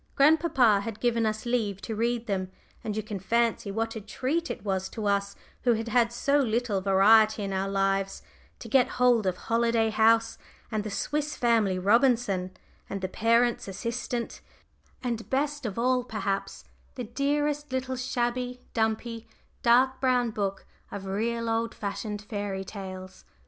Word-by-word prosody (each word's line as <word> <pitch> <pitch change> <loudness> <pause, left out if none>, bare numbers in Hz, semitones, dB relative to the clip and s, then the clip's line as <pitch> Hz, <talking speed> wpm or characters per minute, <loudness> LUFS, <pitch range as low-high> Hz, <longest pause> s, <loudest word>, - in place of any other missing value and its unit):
Grandpapa 275 -7 +4
had 220 0 -6
given 230 -2 +1
us 215 +1 -3
leave 220 -5 0
to 225 - -4
read 235 +1 0
them, 190 -4 -2 0.3
and 215 -1 -3
you 215 - -1
can 210 -2 -5
fancy 230 +2 0
what 225 +3 -2
a 220 - -5
treat 265 +11 -2
it - - -6
was 190 -1 -1
to 220 -3 -5
us, 200 0 0 0.3
who 245 - +3
had 225 +1 -3
had 235 0 +3
so 280 +4 +2
little 230 -5 0
variety 210 +3 +5
in 195 -1 -3
our 190 +1 -1
lives, 195 0 0 0.3
to - - -9
get 250 +2 +4
hold 245 -5 +4
of 180 -1 0
Holiday 230 -1 +1
House, 225 +1 +3 0.3
and 215 -2 -1
the 215 - -4
Swiss 295 +8 -2
Family 225 -6 +2
Robinson, 205 -2 +2 0.4
and 195 - -4
the 185 - -1
Parent's 230 +4 +2
Assistant, 235 +4 -4 0.6
and 235 -3 -3
best 290 0 -1
of 205 - -6
all 250 +1 +2
perhaps, 200 -4 -3 0.3
the 250 - -4
dearest 290 +4 -1
little 260 0 -2
shabby, 250 0 -2
dumpy, 225 0 -1 0.3
dark 255 +2 +4
brown 250 -3 +2
book 200 -3 -3 0.2
of 195 -1 -7
real 230 +4 -1
old 225 0 -1
fashioned 205 0 -4
fairy 205 -2 -4
tales. 185 -2 -8
225 Hz, 160 wpm, -27 LUFS, 200-245 Hz, 0.6 s, variety